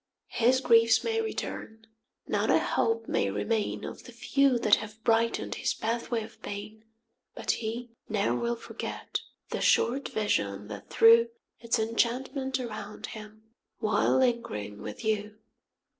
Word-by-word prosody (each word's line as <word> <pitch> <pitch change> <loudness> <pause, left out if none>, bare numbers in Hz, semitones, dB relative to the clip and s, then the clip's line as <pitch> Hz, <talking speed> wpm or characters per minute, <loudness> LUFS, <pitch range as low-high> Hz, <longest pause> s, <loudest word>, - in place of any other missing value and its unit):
5 - - -5
His 260 +1 +4
griefs 230 -2 +5
may 450 0 0
return, 225 - -5 0.4
not - - 0
a - - +6
hope 225 0 0
may 100 - +1
remain 105 - -1
Of - - -7
the - - -10
few 275 -3 +2
that 210 - +5
have 220 +1 -9
brighten 230 0 +2
'd - - -2
his - - 0
pathway 230 0 -2
of 220 - -13
pain, 210 +2 -7 0.5
But - - 0
he 235 +2 -4 0.2
ne'er 210 -1 +1
will 235 0 -1
forget 235 - -5 0.3
the - - -2
short 265 +4 +3
vision 105 - -1
that 105 -2 -8
threw 230 +1 +6 0.3
Its 235 +1 0
enchantment 255 +4 0
around 215 -4 -6
him, 215 0 -11 0.3
while 210 +2 +2
lingering 230 - -1
with 105 - -7
you. 215 -1 -1
225 Hz, 145 wpm, -29 LUFS, 210-235 Hz, 0.5 s, a